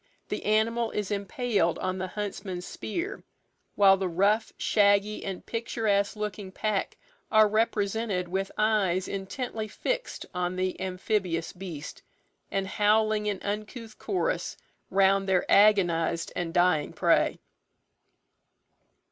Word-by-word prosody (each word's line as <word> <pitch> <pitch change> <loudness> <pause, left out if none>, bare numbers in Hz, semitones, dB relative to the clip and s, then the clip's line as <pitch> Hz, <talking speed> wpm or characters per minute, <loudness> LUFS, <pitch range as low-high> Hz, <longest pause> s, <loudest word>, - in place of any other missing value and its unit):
The - - -3
animal 225 +2 +2
is 210 -1 -3
impaled 200 -3 0
on 185 0 -2
the 185 - -2
huntsman's 195 -2 -5
spear, 345 - -5 0.5
while 195 -1 +6
the 190 -1 -1
rough, 200 +6 +2
shaggy, 205 0 +2
and 190 -2 -5
picturesque 220 -3 0
looking 210 -2 -5
pack 210 0 -2 0.3
are 215 -1 +6
represented 210 -3 0
with 190 +2 -2
eyes 200 -4 +2
intently 215 +3 -4
fixed - - -3
on 180 0 -1
the 185 0 -2
amphibious 185 -2 -1
beast, 170 -6 -8 0.5
and 195 -1 -1
howling 210 +1 +2
in 200 -2 -1
uncouth 215 +2 -5
chorus 445 +6 -1 0.3
round 195 0 +3
their 185 -2 +3
agonized 175 -5 +4
and 170 -2 -2
dying 175 -3 +2
prey. - - +2
200 Hz, 115 wpm, -28 LUFS, 185-215 Hz, 0.5 s, while